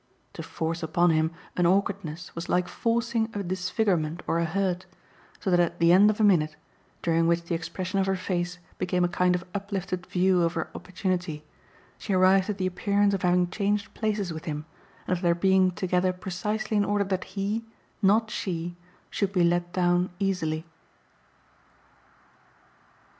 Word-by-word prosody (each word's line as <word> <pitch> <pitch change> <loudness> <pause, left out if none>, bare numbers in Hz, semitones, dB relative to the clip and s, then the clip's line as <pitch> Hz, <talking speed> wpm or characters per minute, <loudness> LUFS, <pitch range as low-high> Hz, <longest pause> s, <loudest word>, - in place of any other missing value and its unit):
To - - -6
force 165 +1 -3
upon 170 +2 +2
him 160 0 +2 0.3
an 175 -1 +3
awkwardness 180 -3 -1
was 170 +1 -6
like 180 0 +2
forcing 230 -1 0
a 200 - -2
disfigurement 180 -3 -1
or 165 - +1
a 170 - +1
hurt, 185 +1 -1 0.5
so 190 - -1
that 175 - +4
at 175 -1 +1
the 170 0 +4
end 195 +4 +7
of 215 - -1
a - - +3
minute, 160 -7 +3 0.5
during 165 -1 +2
which 170 0 +2
the 170 - -4
expression 185 +3 -3
of 190 - +1
her 190 - +2
face 180 -1 -2 0.2
became 180 0 +1
a - - +4
kind 180 +1 +2
of 180 - -4
uplifted 195 -2 -4
view 185 0 +2
of 165 0 +1
her 165 - -3
opportunity, 180 -4 -3 0.5
she 205 - -3
arrived 185 +1 +4
at 205 - -2
the 185 - -1
appearance 200 +2 +1
of 195 - -1
having 180 -1 +2
changed 205 +1 -1
places 210 -5 -1
with 160 - -7
him 150 -1 -4 0.4
and 185 - +1
of 175 - -6
their 170 -2 +3
being 190 +1 +4
together 180 0 0
precisely 210 +4 -2
in 205 - +4
order 205 0 +1
that 190 -2 -2
he 205 +4 -1 0.4
not 215 +2 +3
she 175 -2 -3 0.4
should 200 -2 0
be 180 -3 +2
let 175 0 +1
down 175 0 +2
easily. 165 -5 -1
180 Hz, 170 wpm, -27 LUFS, 175-195 Hz, 0.5 s, end